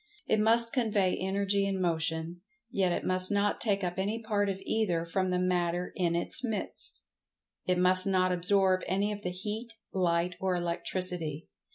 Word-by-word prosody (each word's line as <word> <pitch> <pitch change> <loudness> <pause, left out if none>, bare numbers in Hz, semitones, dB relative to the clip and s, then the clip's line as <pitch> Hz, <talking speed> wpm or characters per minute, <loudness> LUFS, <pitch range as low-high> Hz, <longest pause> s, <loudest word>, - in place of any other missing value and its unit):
It 220 - +2
must 230 +2 +3
convey 210 -7 +1
Energy 200 +1 0
and 195 -1 -1
Motion, 165 0 -1 0.3
yet 190 -4 +1
it - - -2
must 185 +1 0
not 205 0 +1
take 200 -3 +1
up 180 +1 -2
any 205 +4 -1
part 210 -3 0
of 190 -1 -3
either 180 -7 0
from 185 +2 -1
the 180 - +1
Matter 180 -1 0
in 170 -2 +1
its 175 +8 +1
midst. 220 -5 -4 0.7
It 180 0 +2
must 185 +1 +5
not 185 -1 +2
absorb 185 +1 +3
any 200 +3 0
of 205 -1 -5
the 180 - -2
Heat, 215 +5 -5 0.2
Light 175 -1 +1
or 190 -1 0
Electricity. 175 -2 -2
185 Hz, 170 wpm, -30 LUFS, 180-205 Hz, 0.7 s, must